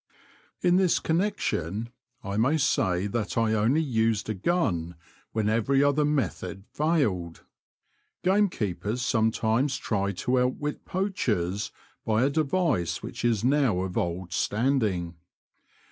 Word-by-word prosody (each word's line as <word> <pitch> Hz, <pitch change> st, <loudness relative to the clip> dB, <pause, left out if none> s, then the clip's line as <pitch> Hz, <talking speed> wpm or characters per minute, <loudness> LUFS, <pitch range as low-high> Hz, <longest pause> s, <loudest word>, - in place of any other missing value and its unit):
In 180 Hz, 0 st, +4 dB
this 185 Hz, -2 st, +3 dB
connection 120 Hz, -, -1 dB, 0.3 s
I 100 Hz, 0 st, -4 dB
may 130 Hz, +9 st, +3 dB
say 95 Hz, -, +1 dB
that 105 Hz, -2 st, -2 dB
I 115 Hz, -1 st, +2 dB
only 115 Hz, +9 st, +2 dB
used 115 Hz, -6 st, 0 dB
a -, -, 0 dB
gun 95 Hz, -, -1 dB, 0.4 s
when 110 Hz, -1 st, 0 dB
every 115 Hz, +6 st, +2 dB
other 145 Hz, +1 st, +3 dB
method 95 Hz, -, -2 dB
failed. 120 Hz, -, 0 dB, 0.8 s
Game 200 Hz, +2 st, +3 dB
keepers 105 Hz, -, -3 dB
sometimes 115 Hz, +3 st, +1 dB
try 100 Hz, -2 st, -1 dB
to 125 Hz, +8 st, 0 dB
outwit 130 Hz, +4 st, -2 dB
poachers 105 Hz, -, -1 dB, 0.3 s
by 110 Hz, +2 st, +2 dB
a 140 Hz, -, +2 dB
device 155 Hz, -, 0 dB
which -, -, -6 dB
is 115 Hz, -3 st, +1 dB
now 130 Hz, -8 st, +2 dB
of 95 Hz, -1 st, -4 dB
old 90 Hz, +1 st, -2 dB
standing. 105 Hz, -8 st, 0 dB
115 Hz, 125 wpm, -27 LUFS, 95-145 Hz, 0.8 s, In